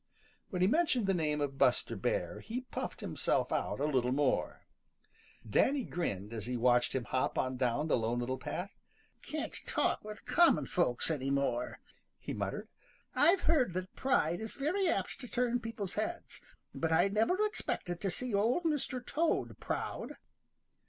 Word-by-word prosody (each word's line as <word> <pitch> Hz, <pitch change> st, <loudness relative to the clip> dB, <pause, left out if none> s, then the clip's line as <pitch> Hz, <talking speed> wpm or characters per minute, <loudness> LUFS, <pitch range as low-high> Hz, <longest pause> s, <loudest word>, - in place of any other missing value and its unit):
When 180 Hz, -2 st, 0 dB
he -, -, +5 dB
mentioned 265 Hz, -, +2 dB
the 195 Hz, -, +2 dB
name 150 Hz, -4 st, 0 dB
of 140 Hz, -1 st, -2 dB
Buster -, -, +3 dB
Bear, -, -, -1 dB
he 235 Hz, +3 st, -4 dB
puffed 255 Hz, -, -5 dB
himself -, -, 0 dB
out -, -, -1 dB
a 145 Hz, -, +1 dB
little 130 Hz, -4 st, +1 dB
more. 140 Hz, 0 st, 0 dB, 0.8 s
Danny 265 Hz, -, +3 dB
grinned 115 Hz, -, -3 dB
as 110 Hz, -2 st, -5 dB
he 125 Hz, 0 st, -1 dB
watched 120 Hz, +1 st, +3 dB
him 130 Hz, -, 0 dB
hop 130 Hz, +2 st, -1 dB
on 130 Hz, 0 st, 0 dB
down 125 Hz, +4 st, 0 dB
the -, -, +3 dB
Lone 115 Hz, +2 st, 0 dB
Little 125 Hz, +2 st, -2 dB
Path. 190 Hz, +3 st, -4 dB, 0.5 s
"Can't 310 Hz, 0 st, -4 dB
talk -, -, +1 dB
with 210 Hz, -1 st, -9 dB
common 345 Hz, -1 st, +4 dB
folks 165 Hz, -4 st, +2 dB
any 135 Hz, -3 st, -1 dB
more," 135 Hz, -3 st, 0 dB, 0.4 s
he -, -, -6 dB
muttered. -, -, -3 dB, 0.5 s
"I've 355 Hz, +2 st, +5 dB
heard 280 Hz, -, +3 dB
that 185 Hz, 0 st, -4 dB
pride 175 Hz, -, +1 dB
is 220 Hz, -, -2 dB
very 350 Hz, +8 st, +1 dB
apt 335 Hz, -, -1 dB
to 250 Hz, -, -7 dB
turn 245 Hz, 0 st, +1 dB
people's 220 Hz, -5 st, -4 dB
heads, 335 Hz, +11 st, -3 dB, 0.3 s
but 165 Hz, 0 st, -1 dB
I 160 Hz, +4 st, +5 dB
never 220 Hz, -, +2 dB
expected 175 Hz, -, -3 dB
to 195 Hz, -, 0 dB
see 250 Hz, +5 st, -3 dB
Old 225 Hz, +12 st, +2 dB
Mr. 280 Hz, -6 st, -1 dB
Toad 330 Hz, +2 st, 0 dB
proud." -, -, -3 dB
185 Hz, 165 wpm, -33 LUFS, -, 0.8 s, he